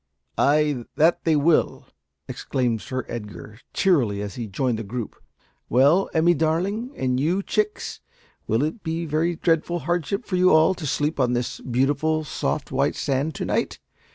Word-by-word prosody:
"Ay, 145 -3 +2
that 165 +3 +3
they 160 -2 +3
will!" 155 +2 +2 0.4
exclaimed 120 -4 -2
Sir 130 -2 -4
Edgar, 105 -1 -8
cheerily, 125 - +2
as 100 -1 -5
he 120 -3 -5
joined 115 +3 -1
the - - -4
group. 115 +2 -5 0.5
"Well, 145 - +4
Emmie 170 +2 +4
darling 185 +10 -1
and 125 -1 0
you, 175 +8 +1
chicks 425 - -2 0.5
will 115 +5 +1
it 155 +9 -3
be 165 0 -3
a - - -4
very 160 +3 0
dreadful 165 +1 +1
hardship 175 - -2
for 185 - -1
you 185 0 +5
all 160 +4 +5
to 165 -5 -6
sleep 145 +2 -1
on 125 -2 +2
this 120 0 -2
beautiful, 145 +5 0
soft, 150 0 -3
white 135 +2 +1
sand 140 +2 -1
to - - -3
night? - - -1
150 Hz, 165 wpm, -23 LUFS, 125-170 Hz, 0.5 s, you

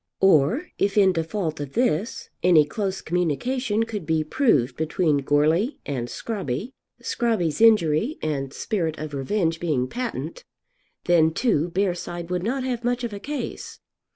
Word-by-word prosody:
Or, 195 - +4
if 200 +1 +1
in 190 -2 +5
default 165 -1 -2
of 145 -2 -6
this, 235 -2 -1
any 170 -4 +6
close 195 +4 -3
communication 210 - 0
could 220 -4 -5
be 160 -1 +2
proved 155 - +2
between 160 0 +1
Goarly 155 - +2
and 125 -4 -3
Scrobby, 200 - -4 0.3
Scrobby's 220 -8 -1
injury 215 - +4
and 140 -3 -2
spirit 165 -3 -2
of 155 -1 -6
revenge 165 +4 0
being 145 -7 0
patent, 255 - -5 0.6
then 165 -2 +5
too 175 - +1
Bearside 175 -2 -2
would 180 -1 0
not 255 +7 -1
have 245 -2 -2
much 245 +1 0
of 235 -3 -3
a 200 - -5
case. 290 +7 -6
180 Hz, 145 wpm, -24 LUFS, 155-225 Hz, 0.6 s, any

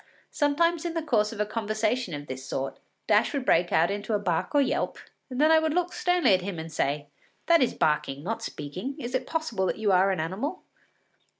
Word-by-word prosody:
Sometimes 320 +3 +2
in 340 -1 -3
the 330 - -1
course 220 -8 +1
of 225 - -8
a 210 - +2
conversation 215 -2 -1
of 145 0 -7
this 130 -1 -7
sort, 135 0 -4 0.3
Dash 215 +6 +3
would 270 -2 -2
break 175 -4 +3
out 165 +3 +3
into 205 +2 -2
a - - +3
bark 180 - -1
or - - +6
a - - +5
yelp, - - -1 0.3
and 255 0 -5
then 310 +2 +5
I 320 - +7
would 315 0 0
look 360 0 0
sternly 355 - +3
at 185 - +3
him 185 -1 -5
and 160 0 -7
say: 145 0 -1 0.4
“That 335 -2 +5
is 255 - +1
barking, 145 -2 0
not 225 +6 -3
speaking. 180 - -5
Is 240 +1 -6
it 260 0 -1
possible 275 - -1
that - - -1
you 215 -2 +1
are 190 +1 +4
an 190 -3 0
animal? 195 - -3
215 Hz, 225 wpm, -27 LUFS, 175-290 Hz, 0.4 s, I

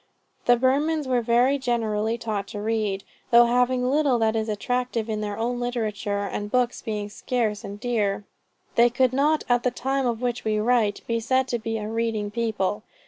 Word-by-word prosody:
The 245 - +7
Burmans 290 +5 +1
are 250 -2 +1
very 245 +4 +3
generally 225 -3 0
taught 210 -4 -3
to 205 - -6
read, 210 -2 -1 0.3
though 240 0 +7
having 250 +1 +2
little 280 -2 +3
that 225 -1 +1
is 220 0 -1
attractive 240 +1 -1
in 215 -1 -2
their 205 -1 -3
own 240 +2 -1
literature, 215 -4 -2
and 205 +1 -4
books 250 +1 0
being 210 -2 -3
scarce 215 0 -2
and 200 +1 -7
dear, 210 -4 0 0.5
they 235 +1 +5
could 255 +1 +2
not 300 +3 +2
at 245 -1 +3
the 250 - +1
time 265 +2 -1
of 235 -2 -1
which 245 -1 -1
we 215 -1 0
write, 215 -2 +2
be 230 0 0
said 260 +3 +1
to 240 - -1
be 225 0 -3
a 210 -1 -4
reading 220 -2 -2
people. 215 -3 -1
230 Hz, 190 wpm, -25 LUFS, 215-250 Hz, 0.5 s, The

